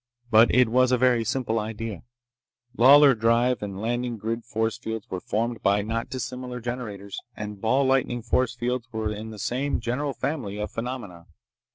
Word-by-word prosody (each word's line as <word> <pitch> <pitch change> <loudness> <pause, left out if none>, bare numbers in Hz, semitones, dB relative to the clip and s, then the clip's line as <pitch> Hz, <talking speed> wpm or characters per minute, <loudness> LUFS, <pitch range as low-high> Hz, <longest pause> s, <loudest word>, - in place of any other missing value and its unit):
But 110 +2 +7
it 125 -1 +5
was 125 +2 +3
a 125 - +4
very 125 -2 +3
simple 115 -1 -1
idea. 110 -3 -5 0.7
Lawlor 140 +3 +8
drive 115 +1 +2
and 100 -2 -5
landing 120 +2 -2
grid 115 +2 -3
force 110 -1 -1
fields 110 -2 -5
were 95 - -2
formed 115 +4 -2
by 100 +1 +2
not 115 +2 -3
dissimilar 125 -1 -5
generators, 110 -5 -5 0.2
and 105 -2 -6
ball 130 +5 +2
lightning 130 -3 +1
force 120 +1 +1
fields 125 0 -2
were 110 -2 -2
in 110 +1 -7
the 110 - -9
same 130 +7 -1
general 125 +5 -2
family 125 -10 -3
of 105 - -3
phenomena. 115 -8 -6
115 Hz, 170 wpm, -25 LUFS, 110-125 Hz, 0.7 s, Lawlor